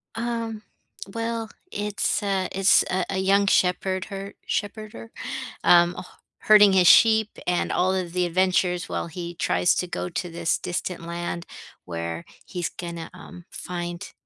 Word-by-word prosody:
Um, 230 -2 -3 0.5
well, 230 -1 -3 0.2
it's 205 0 -1
a 195 -2 0
it's 195 0 +4
a 185 -1 0
a - - -2
young 195 +1 +3
shepherd 185 0 +1
her? 195 -1 -7
Shepherder? 205 - -4 0.5
Um, 175 0 +5
h 180 - -6 0.4
herding 210 -2 +8
his 180 -2 +5
sheep 220 -1 +6 0.2
and 180 0 +1
all 185 +1 +2
of 180 -3 -3
the 180 0 +1
adventures 180 0 +1
while - - -2
he 170 +1 -7
tries 90 - +2
to 180 - -1
go 180 0 -4
to 175 +1 -3
this 170 0 0
distant 180 0 -4
land 170 0 -4 0.4
where 85 -1 -5 0.2
he's 175 -3 -3
gonna, 170 -2 -7
um, 175 -1 -12
find, 175 -1 -6
180 Hz, 145 wpm, -25 LUFS, 175-200 Hz, 0.5 s, herding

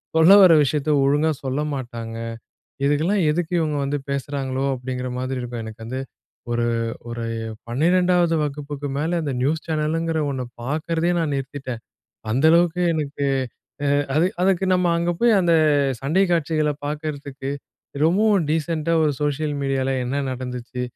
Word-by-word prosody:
சொல்ல 160 +4 +7
வர 185 -3 +8
விஷயத்த 145 +1 -1
ஒழுங்கா 145 +3 +3
சொல்ல 135 +2 -1
மாட்டாங்க. 115 -4 -5 0.7
இதுக்கெல்லாம் 160 +8 +2
எதுக்கு 165 +2 -2
இவங்க 155 -2 0
வந்து 145 +1 -1
பேசுறாங்களோ! 135 -1 -2
அப்படிங்கிற 125 0 -4
மாதிரி 130 +1 -3
இருக்கும். 120 -1 -5
எனக்கு 110 0 -9
வந்து 130 +3 -4 0.5
ஒரு 120 0 +1 0.4
ஒரு 115 0 -4 0.4
12வது 175 +6 +2
வகுப்புக்கு 145 0 -4
மேலே 160 +4 0
அந்த 145 -3 -2
நியூஸ் 155 +5 0
சேனலுங்கிற 160 +1 0
ஒண்ண 130 -2 -3 0.2
பார்க்குறதையே 160 +6 -1
நான் 155 -3 0
நிறுத்திட்டேன். 135 -3 -5 0.5
அந்த 130 +7 +3
அளவுக்கு 170 +1 +3
எனக்கு 145 -2 -2 0.6
அ - - +1 0.3
அது, 165 +4 +4
அதுக்கு 190 0 +2
நம்ம 180 -1 +2
அங்கே 170 +1 0
போய் 235 0 +4
அந்த 170 -2 +3 0.5
சண்டை 155 +8 +2
காட்சிகள 155 -2 +1 0.2
பார்க்கறதுக்கு 145 -2 -5 0.5
ரொம்பவும் 195 +2 +3
டீசென்ட்டா 160 +1 0
ஒரு 150 - +3
சோசியல் 150 +1 -1
மீடியால 135 -1 0
என்ன 135 +3 -1
நடந்துச்சு, 125 -1 -5
145 Hz, 135 wpm, -22 LUFS, 130-165 Hz, 0.7 s, வர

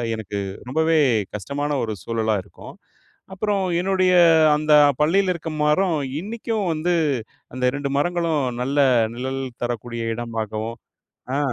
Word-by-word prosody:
எனக்கு 105 -2 -5 0.3
ரொம்பவே 160 +3 +2 0.4
கஷ்டமான 140 +8 -3
ஒரு 110 -1 -3
சூழலா 110 -2 0
இருக்கும். 100 - -13 0.6
அப்புறம் 200 +1 -1 0.2
என்னுடைய 185 0 +2 0.4
அந்த 155 0 0 0.3
பள்ளியில 185 +5 +3
இருக்க 165 -1 -6
மரம் 165 +3 +2 0.2
இன்னிக்கும் 220 +1 -3
வந்து 165 +3 0 0.6
அந்த 130 0 -3
2 140 -1 -3
மரங்களும் 165 -1 0 0.2
நல்ல 140 +3 0 0.3
நிழல் 130 +2 -4 0.2
தரக்கூடிய 120 -1 -3
இடம்மாகவும் 115 0 -4 0.6
ஆ. - - 0
145 Hz, 115 wpm, -22 LUFS, 120-175 Hz, 0.6 s, பள்ளியில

